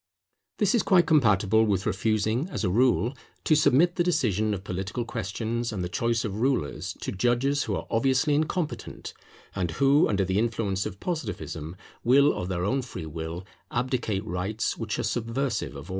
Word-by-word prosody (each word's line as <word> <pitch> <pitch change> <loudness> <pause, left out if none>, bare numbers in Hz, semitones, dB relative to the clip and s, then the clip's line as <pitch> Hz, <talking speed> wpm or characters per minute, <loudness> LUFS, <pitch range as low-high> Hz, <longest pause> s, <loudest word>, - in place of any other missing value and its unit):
This 205 -2 +2
is 235 - +4
quite 180 -3 +4
compatible 110 - +4
with 100 -3 0
refusing, 110 - 0
as 180 - -4
a 95 - +1
rule, 125 +3 +2 0.3
to - - +3
submit 155 +4 +4
the 175 - +3
decision 110 - +1
of 95 - -7
political 95 +5 -3
questions 115 +2 -3
and 95 -4 -3
the 90 - -3
choice 115 -1 0
of 105 +1 -4
rulers 130 - -1
to - - -3
judges 125 +7 +1
who 105 - -1
are - - -4
obviously 135 +5 +2
incompetent; 155 +2 -2 0.4
and 90 -3 -1
who, 140 +2 +5
under 100 -2 +1
the 95 +2 +1
influence 110 -4 -1
of 100 -2 -9
Positivism, 100 - -4 0.3
will 140 +4 +5
of 90 - -4
their 90 -1 -1
own 135 +6 +1
free 95 -10 -7
will 80 +3 -6 0.2
abdicate 120 -5 -1
rights 105 +4 -2
which 110 -3 -3
are - - -2
subversive 115 - -2
of 70 - -7
order. - - -15
115 Hz, 175 wpm, -26 LUFS, 95-135 Hz, 0.4 s, who